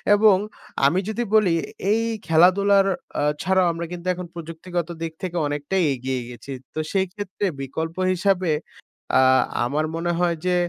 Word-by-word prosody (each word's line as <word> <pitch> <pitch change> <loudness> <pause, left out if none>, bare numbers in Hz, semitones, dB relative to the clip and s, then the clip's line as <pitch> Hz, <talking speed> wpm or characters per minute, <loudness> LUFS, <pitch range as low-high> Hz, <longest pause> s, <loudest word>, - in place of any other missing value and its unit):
এবং 210 -1 +6 0.5
আমি 170 +7 +4
যদি 230 +2 -1
বলি 205 -6 +4 0.4
এই 225 +2 +3 0.3
খেলাধুলার 195 +4 +5 0.3
আ - - +1 0.2
ছাড়াও 190 0 +3
আমরা 170 0 -4
কিন্তু 180 0 -6
এখন 180 0 -7
প্রযুক্তিগত 170 +1 -5
দিক 165 -1 -3
থেকে 175 -1 -3
অনেকটাই 145 +6 -1
এগিয়ে 130 0 -3
গেছি। 125 +3 -10 0.2
তো - - -3
সেই 190 -1 +2
ক্ষেত্রে 205 -1 -4 0.2
বিকল্প 160 +5 -4 0.2
হিসাবে 185 -2 +1 0.7
আ - - +6 0.4
আমার 150 +5 0
মনে 175 +1 -1
হয় 175 -2 +1
যে, 180 0 +2
175 Hz, 150 wpm, -23 LUFS, 160-190 Hz, 0.7 s, এবং